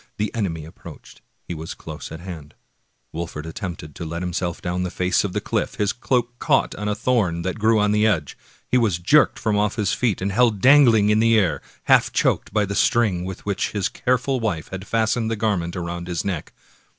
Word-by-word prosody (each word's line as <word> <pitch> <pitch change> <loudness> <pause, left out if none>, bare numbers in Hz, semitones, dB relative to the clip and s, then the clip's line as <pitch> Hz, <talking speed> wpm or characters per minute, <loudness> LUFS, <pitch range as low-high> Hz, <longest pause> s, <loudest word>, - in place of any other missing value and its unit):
The 105 +1 -2
enemy 85 -9 -2
approached 80 - -13
— - - -46
he - - -4
was 80 0 -7
close - - -9
at 80 - -8
hand. 80 -5 -9 0.6
Wolfert 80 -2 -5
attempted 80 -3 -6
to - - -7
let 85 +2 -4
himself 90 -1 -2
down 90 +1 -2
the 90 - -1
face 90 +1 +1
of 100 - -2
the - - 0
cliflf. - - -2
His 100 -1 0
cloak 120 -1 -1
caught - - +2
in 105 - -5
a 105 - 0
thorn 100 -10 0
that 95 +4 -3
grew 110 +1 +3
on 105 0 +2
the 105 +1 +3
edge. 80 -10 0 0.3
He 125 - +3
was 105 -8 +1
jerked 145 - +4
from 105 -3 0
off 105 +1 0
his 105 -6 0
feet, 120 -6 0
and 95 +2 -2
held 115 0 +3
dangling 120 -4 +6
in 105 - +3
the 115 0 +4
air, 85 -9 +1 0.2
half - - +4
choked - - 0
by 105 -1 +1
the 100 - -4
string 100 -5 +2
with 95 -1 -7
which 100 -1 -1
his 105 -3 0
careful 130 +1 0
wife 100 -9 -2
had 95 +1 -7
fastened 115 0 +1
the 115 - -1
garment 100 -6 -1
around 85 0 -4
his 85 -2 -3
neck. 90 -6 -3
100 Hz, 215 wpm, -22 LUFS, 85-110 Hz, 0.6 s, dangling